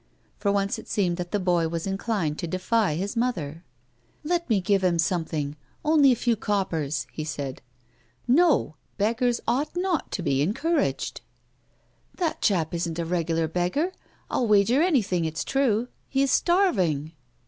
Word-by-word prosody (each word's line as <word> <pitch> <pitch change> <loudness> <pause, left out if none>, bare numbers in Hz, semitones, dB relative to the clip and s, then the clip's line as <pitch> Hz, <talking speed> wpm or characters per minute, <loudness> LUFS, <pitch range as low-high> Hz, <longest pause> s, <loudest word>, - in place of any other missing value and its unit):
For 200 - +1
once 200 0 0
it - - -12
seemed 180 -4 +1
that 175 -1 -4
the 205 - 0
boy 175 -3 +2
was 165 0 -3
inclined 195 -5 -1
to 170 - -3
defy 185 +1 +1
his 195 +5 -3
mother. 175 - -2 0.3
" 120 - -39
Let 340 0 -1
me 215 -4 +3
give 195 +1 +1
him 175 -2 +2
something 160 -4 -1 0.2
— - - -31
only 300 -3 +6
a - - +3
few 235 0 +1
cop 205 -2 -1
pers," 155 -2 -2
he 155 - -5
said. 145 -3 -5 0.4
" - - -35 0.2
No; 275 - +3 0.2
beggars 235 +3 +1
ought 280 +8 0
not 355 -3 -1
to 180 - -2
be 140 -4 +1
encouraged." 300 - 0 0.5
" - - -35
Tiiat 340 -4 -1
chap 175 -6 +1
isn't 170 -1 -2
a 170 - -2
regular 165 -1 0
beggar, 180 - 0 0.4
I'll 245 - 0
wager 215 +6 +4
anything 235 - +2
it's 155 -2 -2
true. 245 -4 +1 0.2
He 270 0 +2
is 275 - +1
starving." 185 - +2
195 Hz, 170 wpm, -26 LUFS, 165-250 Hz, 0.5 s, only